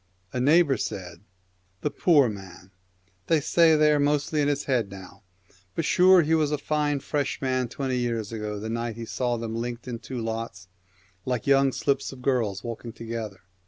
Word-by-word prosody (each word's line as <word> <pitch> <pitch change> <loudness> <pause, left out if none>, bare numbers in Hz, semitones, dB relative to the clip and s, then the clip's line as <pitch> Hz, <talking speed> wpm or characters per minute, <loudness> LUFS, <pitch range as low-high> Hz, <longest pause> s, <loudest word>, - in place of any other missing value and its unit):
A 125 - -1
neighbour 145 +1 +4
said, 90 -4 -5 0.6
'The 150 - -1
poor 145 -2 +4
man, 95 -3 -9 0.6
they 160 - +4
say 160 +2 +4
they 150 0 +4
are 150 - +3
mostly 145 +1 +1
in 145 - +2
his 145 -1 0
head 120 -7 0
now, 95 -1 -11 0.5
but 165 - -1
sure 185 +1 +6
he 155 +2 +1
was 155 -2 +3
a 150 - +1
fine 145 0 0
fresh 145 +1 -2
man 130 -2 0
twenty 130 -1 -2
years 115 -3 -2
ago 105 -2 -4
the 110 - -5
night 115 0 -3
he 115 0 -6
saw 120 +1 -1
them 115 -1 -4
linked 120 +1 -4
in 120 -2 -4
two 130 +1 -7
lots, 115 -4 -5 0.6
like 125 0 -2
young 135 -1 +4
slips 140 +1 -1
of 130 -2 -12
girls 115 -8 0
walking 115 0 -6
together. 115 -5 -6
125 Hz, 185 wpm, -26 LUFS, 115-145 Hz, 0.6 s, sure